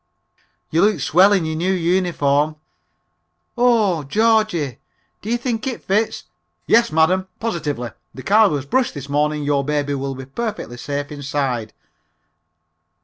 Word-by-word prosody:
"You 165 Hz, -, +2 dB
look 205 Hz, -3 st, +3 dB
swell 180 Hz, +9 st, +4 dB
in 190 Hz, -5 st, +2 dB
your 160 Hz, 0 st, -2 dB
new 175 Hz, +4 st, 0 dB
uniform." 165 Hz, -5 st, +1 dB, 1.0 s
"Oh, 225 Hz, -9 st, +3 dB
Georgie, 205 Hz, -, +1 dB, 0.4 s
do 210 Hz, -, -7 dB
you 240 Hz, -, +1 dB
think 240 Hz, 0 st, -3 dB
it 255 Hz, -, -4 dB
fits? 210 Hz, +3 st, 0 dB, 0.4 s
(Yes, 235 Hz, +1 st, +4 dB
madam, 180 Hz, +4 st, +2 dB
positively, 150 Hz, -, -3 dB, 0.2 s
the 130 Hz, -, -10 dB
car 210 Hz, +1 st, +5 dB
was 145 Hz, -3 st, -2 dB
brushed 255 Hz, -, 0 dB
this 140 Hz, -1 st, -7 dB
morning, 150 Hz, +1 st, 0 dB
your 145 Hz, -1 st, +1 dB
baby 145 Hz, 0 st, -1 dB
will 135 Hz, -1 st, -3 dB
be 130 Hz, 0 st, -8 dB
perfectly 205 Hz, -, -5 dB
safe 145 Hz, +3 st, -4 dB
inside.)" 135 Hz, -6 st, -3 dB
160 Hz, 140 wpm, -20 LUFS, 140-210 Hz, 1.0 s, car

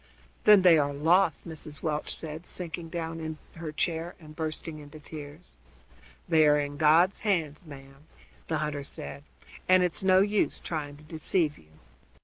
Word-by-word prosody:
"Then 210 Hz, -3 st, +8 dB
they 170 Hz, -4 st, +7 dB
are 145 Hz, -1 st, +1 dB
lost," 165 Hz, +4 st, +2 dB
Mrs. 155 Hz, -2 st, -6 dB
Welch 150 Hz, -1 st, -1 dB
said, 160 Hz, +2 st, -7 dB
sinking 170 Hz, -2 st, -5 dB
down 165 Hz, -1 st, -4 dB
in 160 Hz, -1 st, -5 dB, 0.2 s
her 160 Hz, -2 st, -5 dB
chair 165 Hz, +2 st, -2 dB
and 155 Hz, -2 st, -13 dB
bursting 155 Hz, 0 st, -4 dB
into 150 Hz, +1 st, -12 dB
tears. 150 Hz, +2 st, -10 dB, 0.8 s
"They 160 Hz, -2 st, +5 dB
air 150 Hz, 0 st, +5 dB
in 145 Hz, 0 st, -3 dB
God's 160 Hz, +5 st, +4 dB
hands, 165 Hz, -6 st, -1 dB
ma'am," 135 Hz, +1 st, -13 dB, 0.4 s
the -, -, 0 dB
hunter 150 Hz, -1 st, -2 dB
said, 140 Hz, 0 st, -8 dB, 0.5 s
"and 185 Hz, 0 st, +6 dB
it's 180 Hz, +3 st, 0 dB
no 190 Hz, -1 st, +5 dB
use 205 Hz, +1 st, +1 dB
trying 145 Hz, -3 st, -5 dB
to 150 Hz, -, -17 dB
deceive 155 Hz, 0 st, -1 dB
you." 80 Hz, 0 st, -22 dB
160 Hz, 160 wpm, -28 LUFS, 150-170 Hz, 0.8 s, Then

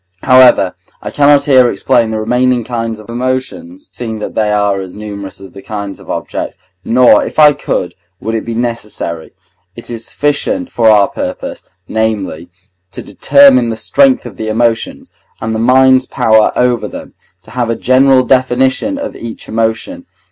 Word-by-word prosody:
However, 130 Hz, -7 st, +5 dB, 0.3 s
I -, -, -5 dB
cannot 145 Hz, -1 st, +3 dB
here 130 Hz, -3 st, +4 dB
explain 120 Hz, +2 st, +1 dB
the 110 Hz, 0 st, -3 dB
remaining 125 Hz, +2 st, +1 dB
kinds 115 Hz, -1 st, -4 dB
of 110 Hz, -, -14 dB
emotions 130 Hz, -, -4 dB
(seeing 115 Hz, -2 st, -5 dB
that 105 Hz, -, -6 dB
they 105 Hz, -1 st, 0 dB
are 100 Hz, -2 st, 0 dB
as 95 Hz, -1 st, -9 dB
numerous 100 Hz, -2 st, -8 dB
as 95 Hz, -1 st, -12 dB
the 100 Hz, -, -12 dB
kinds 100 Hz, -1 st, -6 dB
of -, -, -16 dB
objects), -, -, -5 dB, 0.3 s
nor, 125 Hz, +1 st, +4 dB
if -, -, -7 dB
I 150 Hz, -1 st, +6 dB
could, 90 Hz, -9 st, -3 dB, 0.3 s
would 110 Hz, -, -4 dB
it 110 Hz, -, -2 dB
be 115 Hz, -, -5 dB
necessary. 110 Hz, -8 st, -4 dB, 0.4 s
It 120 Hz, -, -10 dB
is 115 Hz, -1 st, -5 dB
sufficient 255 Hz, -, -2 dB
for 115 Hz, -1 st, +3 dB
our 105 Hz, -2 st, +5 dB
purpose, 275 Hz, -1 st, -6 dB, 0.2 s
namely, 105 Hz, -6 st, -3 dB, 0.4 s
to -, -, -6 dB
determine 135 Hz, -4 st, +4 dB
the 115 Hz, -, -3 dB
strength 270 Hz, -, +2 dB
of -, -, -10 dB
the 110 Hz, -, -5 dB
emotions, 115 Hz, +1 st, -1 dB, 0.3 s
and 110 Hz, 0 st, -3 dB
the 110 Hz, -, -2 dB
mind's 130 Hz, +2 st, +4 dB
power 110 Hz, -4 st, +2 dB
over 125 Hz, -1 st, 0 dB
them, -, -, -10 dB, 0.3 s
to -, -, -16 dB
have 120 Hz, -1 st, -2 dB
a 115 Hz, -, 0 dB
general 130 Hz, +2 st, +3 dB
definition 130 Hz, -, +1 dB
of 280 Hz, -1 st, -6 dB
each 115 Hz, -1 st, -9 dB
emotion. 115 Hz, -, -3 dB
120 Hz, 170 wpm, -13 LUFS, 110-130 Hz, 0.4 s, I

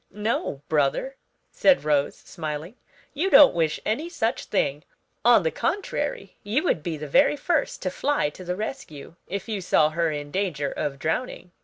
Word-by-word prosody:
"No, 210 Hz, -9 st, -3 dB
brother," 155 Hz, -, 0 dB, 0.4 s
said 280 Hz, -, +3 dB
Rose, 145 Hz, -2 st, +1 dB
smiling, 160 Hz, +3 st, -6 dB, 0.4 s
"you 340 Hz, +7 st, 0 dB
don't 295 Hz, -7 st, +8 dB
wish 160 Hz, -3 st, 0 dB
any 295 Hz, +11 st, -1 dB
such 235 Hz, -8 st, -2 dB
thing; 145 Hz, -6 st, -1 dB, 0.4 s
on 235 Hz, -4 st, +6 dB
the 160 Hz, -, 0 dB
contrary, 410 Hz, +7 st, -3 dB
you 225 Hz, +9 st, 0 dB
would 180 Hz, -, +1 dB
be 160 Hz, 0 st, -4 dB
the 150 Hz, 0 st, -6 dB
very 285 Hz, -, +4 dB
first 320 Hz, -1 st, -1 dB
to 185 Hz, -, -1 dB
fly 275 Hz, -, 0 dB
to 185 Hz, -, -11 dB
the 180 Hz, 0 st, -3 dB
rescue 185 Hz, -, -7 dB
if 200 Hz, +4 st, -5 dB
you 210 Hz, -3 st, -3 dB
saw 155 Hz, -3 st, +3 dB
her 165 Hz, +1 st, 0 dB
in 145 Hz, -1 st, -5 dB
danger 155 Hz, -7 st, -1 dB
of 140 Hz, -2 st, -3 dB
drowning." 175 Hz, -, -3 dB
180 Hz, 170 wpm, -25 LUFS, 150-250 Hz, 0.4 s, don't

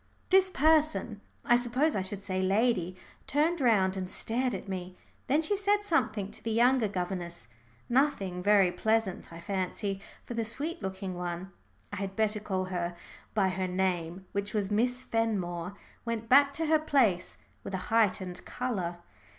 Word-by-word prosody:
This 380 Hz, 0 st, +6 dB
person 310 Hz, -, +2 dB, 0.2 s
I 240 Hz, -, +5 dB
suppose 250 Hz, +6 st, +1 dB
I 195 Hz, -, +1 dB
should 195 Hz, +1 st, -5 dB
say 185 Hz, -2 st, -1 dB
lady 190 Hz, -2 st, +1 dB, 0.3 s
turned 310 Hz, +3 st, +1 dB
round 195 Hz, -6 st, +3 dB
and 185 Hz, -1 st, -4 dB
stared 245 Hz, +3 st, -1 dB
at 195 Hz, -, -7 dB
me. 185 Hz, -1 st, -5 dB, 0.3 s
Then 295 Hz, +4 st, +3 dB
she 410 Hz, +6 st, +1 dB
said 410 Hz, +1 st, +2 dB
something 220 Hz, -, 0 dB
to -, -, -9 dB
the 230 Hz, -, -2 dB
younger 240 Hz, +1 st, +4 dB
governess, 175 Hz, -, -4 dB, 0.4 s
nothing 235 Hz, -9 st, +1 dB
very 200 Hz, -2 st, +5 dB
pleasant, 220 Hz, -3 st, 0 dB
I 165 Hz, -, -9 dB
fancy, 195 Hz, +2 st, -2 dB, 0.2 s
for -, -, -6 dB
the 230 Hz, -1 st, -1 dB
sweet 285 Hz, +9 st, -3 dB
looking 190 Hz, -1 st, -4 dB
one 175 Hz, +1 st, -5 dB, 0.4 s
I -, -, -3 dB
had 195 Hz, 0 st, -4 dB
better 215 Hz, -1 st, +1 dB
call 190 Hz, -3 st, -2 dB
her 175 Hz, -1 st, -2 dB, 0.4 s
by 195 Hz, -3 st, +3 dB
her 185 Hz, 0 st, -2 dB
name, 180 Hz, -1 st, -1 dB
which 200 Hz, +2 st, -3 dB
was 205 Hz, -1 st, 0 dB
Miss 245 Hz, +4 st, +1 dB
Fenmore 190 Hz, -5 st, -1 dB, 0.3 s
went 230 Hz, -1 st, -3 dB
back 280 Hz, +3 st, +6 dB
to 325 Hz, +3 st, -1 dB
her 315 Hz, 0 st, +4 dB
place 250 Hz, -, +2 dB, 0.3 s
with 195 Hz, -, -4 dB
a 185 Hz, +2 st, -6 dB
heightened 190 Hz, -5 st, +1 dB
colour. 195 Hz, -9 st, -3 dB
205 Hz, 165 wpm, -30 LUFS, 185-245 Hz, 0.4 s, This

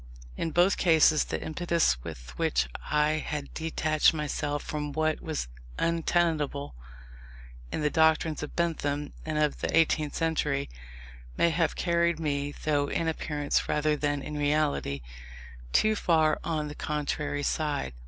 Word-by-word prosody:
In 165 Hz, -, -2 dB
both 175 Hz, +4 st, +3 dB
cases, 160 Hz, -3 st, +4 dB
the -, -, -3 dB
impetus 160 Hz, -, 0 dB
with -, -, -9 dB
which -, -, +1 dB, 0.2 s
I 150 Hz, +1 st, +2 dB
had 145 Hz, -2 st, -5 dB
detached 160 Hz, 0 st, +2 dB
myself 150 Hz, -1 st, -2 dB
from 150 Hz, -1 st, -4 dB
what 155 Hz, +1 st, 0 dB
was 155 Hz, -, -3 dB, 0.3 s
untenable 165 Hz, -4 st, 0 dB, 1.0 s
in -, -, -2 dB
the 150 Hz, 0 st, +1 dB
doctrines 160 Hz, -1 st, +3 dB
of -, -, -6 dB
Bentham 150 Hz, -4 st, -1 dB
and 155 Hz, -1 st, -1 dB
of 150 Hz, -1 st, +1 dB
the -, -, +1 dB
eighteenth 155 Hz, -2 st, +2 dB
century, 150 Hz, -4 st, 0 dB, 0.7 s
may 170 Hz, -, +4 dB
have 165 Hz, 0 st, +1 dB
carried 170 Hz, -1 st, +1 dB
me, 145 Hz, -2 st, -1 dB
though 145 Hz, -2 st, +1 dB
in 165 Hz, -, -1 dB
appearance 150 Hz, -2 st, -1 dB
rather 150 Hz, 0 st, +2 dB
than 145 Hz, -1 st, -1 dB
in 150 Hz, -, -6 dB
reality, 145 Hz, -, 0 dB, 0.7 s
too 215 Hz, -, +3 dB
far 160 Hz, -5 st, +2 dB
on 155 Hz, -2 st, -1 dB
the 150 Hz, -, -6 dB
contrary 150 Hz, -1 st, -2 dB
side. 145 Hz, -, -1 dB
150 Hz, 140 wpm, -28 LUFS, 145-160 Hz, 1.0 s, cases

